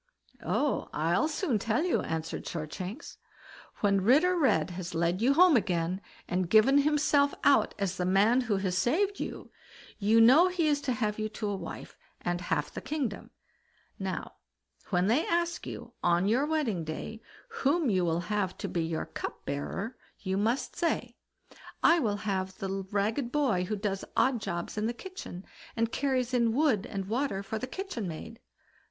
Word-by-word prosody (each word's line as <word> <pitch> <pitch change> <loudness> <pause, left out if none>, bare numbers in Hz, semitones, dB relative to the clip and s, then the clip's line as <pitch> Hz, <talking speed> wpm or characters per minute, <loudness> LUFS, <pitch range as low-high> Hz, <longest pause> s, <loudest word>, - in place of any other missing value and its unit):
"Oh, 290 -1 0
I'll 170 - +1
soon 300 - 0
tell 225 +8 0
you", 360 - +1
answered 160 0 -4
Shortshanks. 180 - -6 0.6
"When 200 -2 +3
Ritter 300 - +4
Red 250 - +2
has 175 0 -6
led 170 +3 +1
you 265 +4 +4
home 355 -1 +7
again, 180 -3 0 0.3
and 180 -1 -1
given 220 +8 +6
himself 290 -1 +3
out 280 - +4
as 195 -2 -2
the 180 - -1
man 205 +7 +4
who 220 -5 0
has 190 -2 -1
saved 385 - +1
you, - - -6 0.5
you 215 +2 +4
know 265 +10 +7
he 360 -3 0
is 290 -1 +2
to 270 -3 -1
have 215 -2 -1
you 215 0 -1
to 210 -1 -3
wife, 180 -4 -8 0.2
and 175 0 -2
half 150 -4 -1
the - - -5
kingdom. 275 -9 -3 0.7
Now, - - -4 0.5
when 180 -2 +2
they 240 +10 +2
ask 340 0 -1
you, - - -8
on 175 +2 +2
your 255 +7 +2
wedding 270 - 0
day, 160 +8 -6 0.4
whom 285 -1 +2
you 185 -2 +2
will 170 0 +1
have 195 0 -2
to - - -4
be 170 - -1
your 160 0 -2
cup - - -7
bearer, 190 - -4 0.2
you 190 -1 -2
must 225 +6 0
say, 340 - -1 0.7
'I 335 +1 +6
will 210 -7 0
have 190 -2 -2
the 195 0 -3
ragged 220 +5 0
boy 250 -11 +1
who 215 - -2
does 195 -1 -2
odd 255 -4 +3
jobs 175 +2 -4
in 215 - 0
the 235 - -1
kitchen, 300 - -8 0.3
and 230 0 0
carries 260 -3 0
in 235 -2 +3
wood 250 -6 +2
and 195 -2 -4
water 225 -3 -1
for 220 +2 -4
the 255 - -4
kitchen 370 - -5
maid. 225 +8 -8
215 Hz, 170 wpm, -29 LUFS, 185-275 Hz, 0.7 s, home